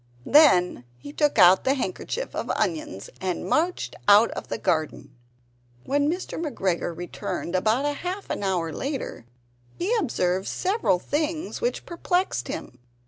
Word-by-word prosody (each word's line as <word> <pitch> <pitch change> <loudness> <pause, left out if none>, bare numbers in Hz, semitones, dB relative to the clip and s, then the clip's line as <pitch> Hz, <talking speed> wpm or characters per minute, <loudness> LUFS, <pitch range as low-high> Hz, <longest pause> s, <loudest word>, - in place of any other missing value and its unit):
Then 185 - +5
he 285 - -10
took 295 -4 +1
out 185 -1 +7
the 270 +1 +2
handkerchief 265 - -4
of - - -3
onions, 160 - -3
and 185 -2 -2
marched 345 +3 0
out 205 +3 +7
of - - -6
the - - -3
garden. 155 - -2 0.7
When 285 +1 +1
Mr. 355 -1 -4
McGregor 185 - -2
returned 175 0 -5
about 235 +10 +1
half 370 +3 -5
an - - -2
hour 180 -5 -1
later 270 - -4 0.5
he 400 +8 0
observed 190 - 0
several 380 - +1
things 310 - -3
which 485 +1 -1
perplexed 345 - -1
him. 125 - -7
235 Hz, 140 wpm, -25 LUFS, -, 0.7 s, out